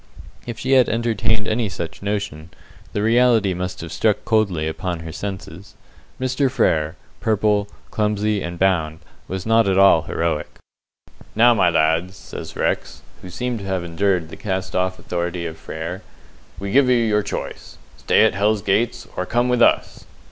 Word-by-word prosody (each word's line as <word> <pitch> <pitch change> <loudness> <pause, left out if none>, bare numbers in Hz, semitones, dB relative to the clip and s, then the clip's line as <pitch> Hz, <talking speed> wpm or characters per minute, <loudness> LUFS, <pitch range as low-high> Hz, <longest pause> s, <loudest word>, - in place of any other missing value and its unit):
If 120 -1 -5
she 130 +3 -3
had 130 -2 +5
entertained 110 -1 0
any 110 -1 0
such 85 -4 -6
notion, 100 -6 -3 0.4
the 105 - -1
reality 115 -3 +4
must 90 +1 -4
have 85 -1 -7
struck 110 -2 +1
coldly 100 -9 +1
upon 85 +1 -3
her 80 0 -7
senses. 95 0 -7 0.4
Mr. 130 +1 +1
Frere, 80 - +1 0.2
purple, 105 -1 +1 0.2
clumsy, 105 -1 0
and 85 0 -5
bound, 80 -4 +1 0.3
was 95 0 -4
not 115 -1 +4
at 95 -1 +2
all 95 -4 +6
heroic. 80 -1 -2 0.8
"Now, 120 +2 +6
my 95 -6 +3
lads," 80 +3 +1
says - - -9
Rex - - -2 0.2
who 90 - -9
seemed 120 +5 -3
to 100 - -8
have 95 -2 -2
endured 85 -1 0
the - - -9
cast 95 -2 -3
off 90 0 0
authority 85 0 -3
of 80 -1 -5
Frere 85 +4 -6 0.6
"we 100 +2 -5
give 135 +2 +4
you 125 - +5
your 110 -3 +2
choice. - - -6 0.2
Stay - - +3
at - - +2
Hell's 105 +1 +1
Gates, 110 +4 0
or 90 - -3
come 120 +1 +1
with 125 -1 +2
us!" - - +2
100 Hz, 165 wpm, -21 LUFS, 85-110 Hz, 0.8 s, all